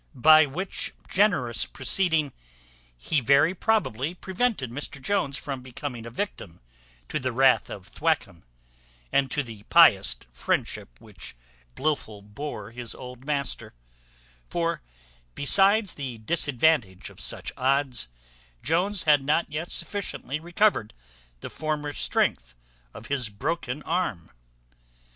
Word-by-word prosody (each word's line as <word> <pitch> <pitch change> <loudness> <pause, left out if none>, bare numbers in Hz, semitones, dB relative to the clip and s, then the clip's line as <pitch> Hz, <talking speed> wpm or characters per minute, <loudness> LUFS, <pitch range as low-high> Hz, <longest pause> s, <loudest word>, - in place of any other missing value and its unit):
By 155 +4 +7
which 180 +8 -4 0.2
generous 160 - +2
proceeding 155 +2 +1 0.6
he 140 - 0
very 140 +7 +4
probably 175 - 0
prevented 190 - -1
Mr 145 +2 -6
Jones 140 -3 -1
from 135 -4 -5
becoming 125 -2 -7
a - - -6
victim 115 - -5 0.5
to - - -2
the 130 0 -2
wrath 130 +2 +4
of - - -8
Thwackum, 85 -1 -1 0.7
and 135 -1 +2
to 145 - -1
the 115 -5 -10
pious 60 - +6 0.2
friendship - - -2
which 100 - -12 0.4
Blifil 135 -9 -2
bore 105 0 -7
his 120 0 -6
old 125 0 -10
master; 140 - -3 0.7
for, 170 0 -1 0.5
besides 195 +6 +5
the 130 -5 -6
disadvantage 125 - +1
of - - -13
such - - -2
odds, 130 - +1 0.6
Jones 180 +5 +1
had 150 -3 +4
not 150 +3 +1
yet 160 +3 -4
sufficiently 185 - -3
recovered 175 - +1 0.5
the - - -6
former 150 -1 -3
strength - - 0 0.4
of - - -11
his 135 -5 -2
broken 135 +5 -3
arm. 165 - -2
140 Hz, 120 wpm, -26 LUFS, 120-165 Hz, 0.7 s, By